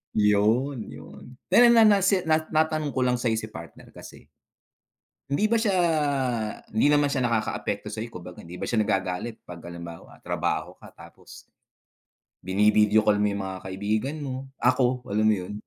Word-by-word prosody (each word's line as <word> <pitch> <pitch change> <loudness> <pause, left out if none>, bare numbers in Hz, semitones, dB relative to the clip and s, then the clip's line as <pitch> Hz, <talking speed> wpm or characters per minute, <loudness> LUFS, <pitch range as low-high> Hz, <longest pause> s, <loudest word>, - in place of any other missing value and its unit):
Yun, 110 +5 +1
yun, 125 0 -13
dahil 235 +6 +6
nga 225 -2 +7
na 200 -2 +4
si 195 0 +3
na 155 0 +2
na 155 0 +3
natanong 155 -2 -3
ko 130 - -3
lang 125 -1 +2
sa'yo 115 -2 0
si 110 - -7
partner 85 -5 -12
kasi, - - -13 1.0
hindi 140 +9 0
ba 225 +1 +2
siya 205 -4 +1 1.0
hindi 110 +7 +3
naman 145 -1 +3
siya 130 -3 0
nakakaapekto 115 -2 -2
sa'yo? 115 +2 -5
Kumbaga, 90 -4 -10
hindi 85 +2 -10
ba - - -5
siya 115 - 0
nagagalit 95 +2 -2
'pag 85 -1 -10
halimbawa 85 -1 -10
trabaho - - -2
ka, - - -13
tapos, - - -14 1.0
bini-video 105 +3 +3
call 105 -1 +2
mo - - +3
yung 100 - -4
mga 95 -1 -5
kaibigan 105 +9 -2
mo, 135 -1 -6
ako. 125 +1 +2
Alam 105 +2 0
mo 110 0 +4
yun? - - -6
115 Hz, 170 wpm, -25 LUFS, 105-145 Hz, 1.0 s, nga